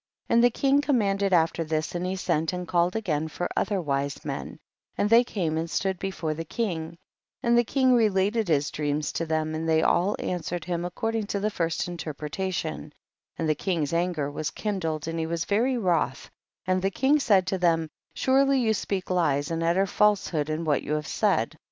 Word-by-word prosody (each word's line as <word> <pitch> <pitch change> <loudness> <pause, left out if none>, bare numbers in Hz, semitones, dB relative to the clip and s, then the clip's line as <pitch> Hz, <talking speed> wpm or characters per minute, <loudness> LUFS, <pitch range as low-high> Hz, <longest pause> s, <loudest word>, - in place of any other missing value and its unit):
12. - - +3
And 235 - +5
the 245 - +7
king 275 +4 +2
commanded 200 -8 +1
af 165 -2 +4
ter 165 - -2
this, 155 0 -2
and 175 0 -2
he 185 - -2
sent 160 -3 0
and 180 -1 -4
called 175 +2 +1
again 160 -8 -1
for 175 +3 -3
other 205 -3 0
wise 140 -3 -2
men, - - -5 0.4
and 210 - +1
they 235 +1 +7
came 165 -9 -2
and 165 +1 -3
stood 190 +4 -1
before 185 -5 -3
the 165 +2 -5
king, 170 -4 -3 0.5
and 235 -1 +3
the 240 - +5
king 260 +2 +2
related 210 -1 +2
his 145 -3 +1
dreams 150 0 -1
to 165 - -3
them, 155 0 -1
and 160 +1 -2
they 160 0 +3
all 185 +5 +2
answered 175 -1 -3
him 175 -1 -2
according 220 +4 -2
to 200 - -2
the 210 +2 -1
first 165 -3 -1
interpretation, 160 - -4 0.5
and 165 - -1
the 155 - +3
king's 160 -2 -2
anger 170 -4 0
was 150 +1 -3
kindled 165 -7 -3
and 165 0 -3
he 160 - -1
was 170 0 -2
very 245 +6 +1
wroth, 180 -8 0 0.3
and 185 0 +1
the 195 - +1
king 270 +9 +2
said 200 -9 +3
imlo 185 0 -1
them, 165 -2 +2 0.3
surely 275 +1 +3
you 225 -3 +2
speak 190 -2 -3
lies 150 -5 +1
and 165 0 -1
utter 170 +4 +2
false 210 +1 +2
hood 150 -3 -1
in 155 +2 -2
what 145 -3 +2
you 150 - -3
have 150 0 -1
said. - - 0
175 Hz, 205 wpm, -26 LUFS, 160-205 Hz, 0.5 s, the